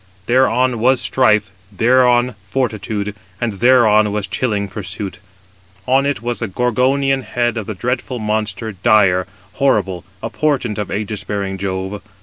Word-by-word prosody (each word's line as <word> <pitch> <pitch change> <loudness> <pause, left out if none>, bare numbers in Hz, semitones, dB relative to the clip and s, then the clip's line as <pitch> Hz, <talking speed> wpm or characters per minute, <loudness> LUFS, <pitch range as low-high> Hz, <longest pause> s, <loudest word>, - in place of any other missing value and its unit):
Thereon 125 0 +2
was 130 +2 +3
Strife, 105 -6 +2 0.2
thereon 125 +3 +3
Fortitude, 105 -4 -2 0.3
and 120 -3 -1
thereon 110 -4 +5
was 105 -1 -2
chilling 100 0 -1
Pursuit; 100 0 -6 0.7
228 130 - 0
on 135 +1 +3
it 140 -4 -2
was 120 0 -2
the 115 - -2
Gorgonian 130 +5 +1
head 120 -2 -1
of 110 -3 -4
the 110 - -4
dreadful 125 +3 -2
monster, 110 0 -2
dire, 95 -1 +3 0.3
horrible, 100 -10 +1 0.2
a - - -3
portent 135 -8 0
of 105 - -2
ægis 105 0 -4
bearing 100 -2 -3
Jove. 95 +1 -3
110 Hz, 140 wpm, -18 LUFS, 100-125 Hz, 0.7 s, thereon